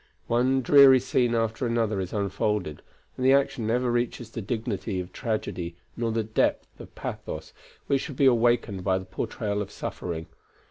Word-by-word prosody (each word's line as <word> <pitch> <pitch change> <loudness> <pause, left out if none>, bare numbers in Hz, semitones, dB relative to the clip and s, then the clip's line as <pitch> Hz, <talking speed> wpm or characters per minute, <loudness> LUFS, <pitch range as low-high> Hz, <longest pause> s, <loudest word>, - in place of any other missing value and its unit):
One 130 +3 +2
dreary 135 0 +8
scene 120 -1 +1
after 115 +2 0
another 115 -3 0
is 95 -1 -4
unfolded, 100 -5 -1 0.3
and 130 - -4
the 130 +1 +6
action 135 -5 +1
never 120 +2 +1
reaches 120 -1 -2
the 115 - -5
dignity 110 -2 -3
of 90 0 -7
tragedy 90 -7 -3 0.2
nor 115 -1 -1
the 110 0 0
depth 110 +1 -1
of - - -13
pathos - - -6 0.3
which 135 -1 +1
should 140 - -6
be 140 - +4
awakened 120 -5 +3
by 95 0 +2
the 95 - -6
portrayal 100 +2 -3
of 100 - -5
suffering. 80 -2 -5
115 Hz, 170 wpm, -26 LUFS, 100-125 Hz, 0.3 s, dreary